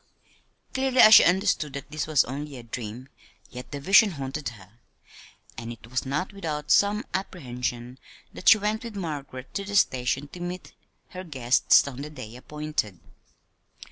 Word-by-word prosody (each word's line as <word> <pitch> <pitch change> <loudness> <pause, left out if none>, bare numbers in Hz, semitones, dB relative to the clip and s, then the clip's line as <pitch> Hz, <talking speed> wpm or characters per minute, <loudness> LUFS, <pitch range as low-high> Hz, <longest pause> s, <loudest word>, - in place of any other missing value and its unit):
Clearly 260 -1 0
as 215 - +9
she - - +10
understood 180 -5 +1
that 140 +1 -8
this 155 0 -3
was 155 -4 +4
only 140 +2 -6
a 120 - -10
dream, 115 +2 -7 0.4
yet 125 0 -9
the 145 - -5
vision 195 +6 +5
haunted 140 0 -4
her; 105 0 -16 0.8
and 115 0 -6
it 115 0 -12
was 130 +1 -2
not 150 +9 -2
without 155 -6 -4
some 205 +3 +3
apprehension 125 -8 -4 0.3
that - - +2
she 225 - +8
went 215 +2 -2
with 230 -3 -8
Margaret 145 -8 -6
to 200 - -3
the 205 +1 -6
station 130 -4 +1
to 180 - -11
meet 175 +1 -6 0.4
her 185 0 -8
guests, 130 -5 +3
on 135 -1 -7
the 150 - -6
day 115 -7 -10
appointed. 150 - -4
145 Hz, 165 wpm, -26 LUFS, 125-185 Hz, 0.8 s, she